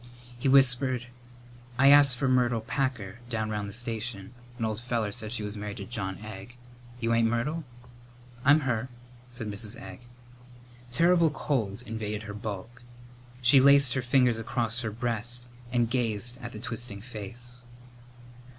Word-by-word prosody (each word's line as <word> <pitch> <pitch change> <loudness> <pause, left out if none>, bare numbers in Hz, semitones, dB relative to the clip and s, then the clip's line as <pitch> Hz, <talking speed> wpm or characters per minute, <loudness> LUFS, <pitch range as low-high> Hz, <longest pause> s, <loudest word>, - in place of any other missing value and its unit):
He 120 +3 -2
whispered, 130 -2 +5 0.7
"I 135 +1 +6
asked 140 -3 +7
for 135 - 0
Myrtle 125 -3 +2
Packer 115 -4 -3
down 110 -2 -2
round 105 -1 -3
the - - -8
station. 115 -2 -4 0.2
An 115 - -1
old 110 -1 -2
feller 120 -4 -1
said 105 +1 -5
she 110 -3 -2
was 105 0 -5
married 105 0 -6
to 100 - -6
John 95 -4 -4
Egg. 110 +2 -9 0.4
You 115 -1 0
ain't 115 0 +3
Myrtle?" 135 +8 -1 0.8
"I'm 145 +3 +6
her," 130 -2 -1 0.4
said 120 -3 -5
Mrs. 105 +1 -3
Egg. 95 -1 -9 0.9
Terrible 170 +4 +4
cold 120 -7 -2
invaded 110 -1 -4
her 105 -1 -7
bulk. 105 +3 -7 0.6
She 130 +3 +7
laced 140 -2 +6
her 130 - 0
fingers 125 -2 +3
across 115 +1 0
her 110 - -2
breast 120 +2 -3 0.3
and 120 -2 +2
gazed 120 0 0
at 120 -2 -6
the 110 - -8
twisting 115 -3 -5
face. 120 +2 -8
120 Hz, 150 wpm, -28 LUFS, 110-125 Hz, 0.9 s, asked